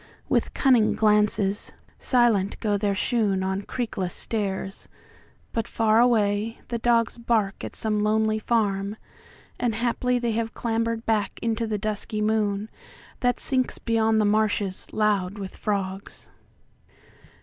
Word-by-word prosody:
With - - 0
cunning 250 -6 +4
glances; 210 -1 +2 0.3
silent 230 -6 +2
go 210 -2 0
their 200 -1 0
shoonOn 195 -4 0
creakless 220 -8 -3
stairs; 195 -3 -3 0.6
but 225 -1 -1
far 220 0 +2
away 220 -2 +2
the 235 -1 -2
dogsBark 230 -3 +1
at - - -6
some 210 -1 0
lonely 215 +1 +2
farm: 205 -3 0 0.6
and 240 -3 0
haply 245 +2 0
theyHave 230 -1 -2
clambered 230 0 -1
back 210 -3 0
into 230 0 0
the 215 -1 -1
dusky 215 0 -3
moonThat 215 +3 -2
sinks 255 -2 -1
beyond 225 -1 +2
the 210 - +3
marshes 205 -2 0
loud 205 -2 +1
with 195 -2 -7
frogs. 195 -2 -4
215 Hz, 115 wpm, -25 LUFS, 205-230 Hz, 0.6 s, cunning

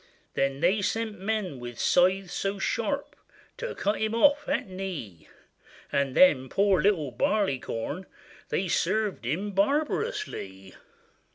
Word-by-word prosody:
Then 135 +1 0
they 190 +5 +3
sent 220 +1 -2
men 195 -8 -2
with 120 -1 -7
scythes 185 +1 +3
so 195 +1 -2
sharp, 195 - -2 0.4
To - - -4
cut 205 +2 0
him 220 +1 0
off 290 +4 +4
at - - 0
knee; 185 - -6 0.6
And 140 -2 0
then 130 -8 +5
poor 195 -1 +3
little 160 -9 +2
Barleycorn, 150 - -1 0.4
They 190 - 0
served 190 - 0
him 180 - -1
barbarously. 275 - -1
190 Hz, 120 wpm, -27 LUFS, 140-215 Hz, 0.6 s, then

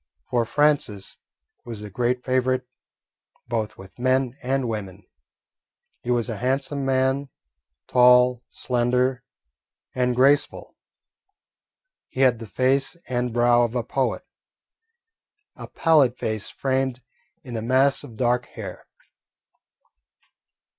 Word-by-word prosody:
For 120 -1 +2
Francis 145 -8 +1 0.5
was 115 -3 -8
a 105 - -7
great 125 +3 -1
favourite 130 0 +1 0.8
both 115 -3 -3
with 95 +4 -14
men 130 0 +1
and 130 0 -1
women. 100 -3 -5 1.0
He 120 - -7
was 120 -1 +1
a 115 -3 -4
handsome 135 +4 -1
man, 135 +1 +1 0.6
tall, 125 0 +5
slender, 125 +1 0 0.7
and 125 -1 0
graceful. 140 +3 +2 1.3
He 130 - -4
had 125 -4 +4
the 115 - -8
face 135 - +1
and 125 -1 -1
brow 120 +1 +4
of 120 0 0
a 120 - 0
poet, 130 +2 -2 1.3
a - - -9
pallid 145 -7 +3
face 110 -2 -3
framed 130 -2 -1 0.4
in 125 -2 -7
a 110 - -2
mass 130 +4 +2
of 115 - -12
dark 125 0 +1
hair. 100 -5 -9
125 Hz, 115 wpm, -24 LUFS, 120-130 Hz, 1.3 s, tall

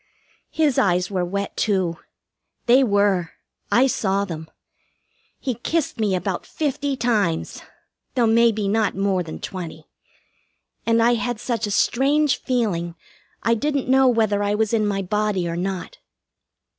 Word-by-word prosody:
His 305 -5 +1
eyes 180 0 +1
were 185 -2 0
wet, 200 +3 -3
too. 185 -6 0 0.7
They 255 +3 +6
were. 200 -6 +1 0.4
I 250 +3 +5
saw 200 -6 0
them. 160 -4 -7 0.9
He 260 - -2
kissed 275 +3 -2
me 205 -3 +1
about 185 0 -2
fifty 285 -2 -2
times 210 -9 0 0.5
though 245 -3 +3
maybe 225 -2 +3
not 215 +1 +1
more 195 -1 +1
than 165 -2 -6
twenty 180 -6 -7 1.0
and 230 0 +4
I 240 +1 +4
had 240 0 -2
such 230 -3 -2
a - - -4
strange 275 +7 +2
feeling 190 -10 -1 0.5
I 230 - +3
didn't 280 +2 -1
know 265 0 +5
whether 220 -4 +2
I 205 0 +1
was 220 +1 0
in 215 -2 +2
my 195 -1 -1
body 205 -2 0
or 170 - -3
not. 190 - -4
210 Hz, 145 wpm, -22 LUFS, 190-245 Hz, 1.0 s, They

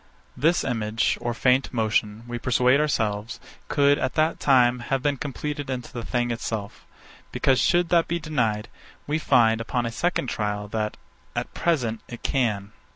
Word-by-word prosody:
This 165 +6 +2
image, 110 -3 0
or 120 -1 -2
faint 130 +2 +2
motion, 110 -2 0
we 120 0 -4
persuade 125 +2 +3
ourselves, 110 -7 -1 0.3
could, 145 0 +3
at 130 - -2
that 155 +1 +1
time, 125 -3 +4
have 130 +1 -2
been 145 -1 +2
compleated 145 +1 -4
into 125 -2 -5
the 120 - -4
thing 120 +1 -1
itself; 110 -3 -5 0.4
because, 130 -2 +2
should 175 -1 +3
that 170 -1 +3
be 170 - -1
denied, 120 -9 -1 0.4
we 150 +2 -1
find, 115 -6 +3
upon 120 +1 -1
a 115 - -2
second 175 +5 0
trial, 105 -3 -2
that, 105 0 -2 0.4
at - - -3
present, 125 -10 0
it 120 - -9
can. 105 -7 0
125 Hz, 160 wpm, -25 LUFS, 110-140 Hz, 0.4 s, time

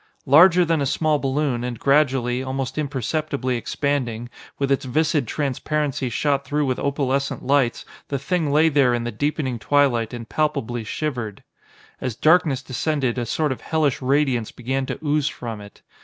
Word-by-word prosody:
Larger 175 +5 +6
than 165 -2 +1
a 140 - +1
small 155 +1 +1
balloon, 135 -3 -1
and 125 -1 -4
gradually, 130 -3 +2
almost 130 0 -3
imperceptibly 140 -1 -2
expanding, 120 -2 -2 0.3
with 140 -1 -1
its 135 - +2
viscid 145 0 +1
transparency 145 0 -1
shot 140 +3 0
through 145 +2 -1
with 130 -2 -1
opalescent 140 -1 -1
lights, 135 -3 +1 0.2
the 140 - -2
Thing 155 +2 -1
lay 155 +3 +5
there 140 -5 +3
in 120 - -2
the 120 - -3
deepening 130 0 -2
twilight 130 -3 +2
and 120 -2 -7
palpably 120 -6 -1
shivered. 120 -4 -4 0.6
As 125 -4 -3
darkness 155 -2 +3
descended, 130 -2 -1
a 120 - -3
sort 150 +5 0
of 130 - -4
hellish 155 -5 0
radiance 130 -4 +1
began 130 +2 -3
to - - -3
ooze 150 -1 +1
from 115 -7 -5
it. 100 0 -14
135 Hz, 160 wpm, -22 LUFS, 125-150 Hz, 0.6 s, Larger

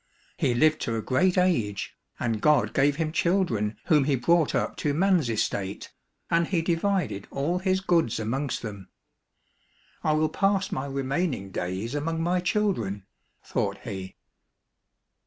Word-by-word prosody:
He 120 - +1
lived 155 +4 +3
to 115 - -1
a 110 - -1
great 180 +9 +2
age, 115 - +1 0.2
and 115 -3 -1
God 140 -9 +3
gave 145 +1 +3
him 155 0 -1
children 160 - +1
whom 150 -4 +4
he 140 -1 +2
brought 160 +5 +2
up - - -1
to 145 -1 0
man's 180 -6 +3
estate, 100 -3 -2 0.4
and 170 0 +3
he 170 -4 0
divided 170 - 0
all 160 +6 -1
his 190 0 +1
goods 170 - +1
amongst 130 +6 -2
them. 100 -4 -7 0.6
" - - -36
I 155 - +2
will 155 0 +2
pass 195 -1 +1
my 135 +1 -2
remaining 135 - -2
days 95 +7 -3
among 160 +3 -2
my 180 +2 +1
children," 180 - -1 0.4
thought - - -2
he. 95 -1 -6
145 Hz, 150 wpm, -26 LUFS, 115-175 Hz, 0.6 s, whom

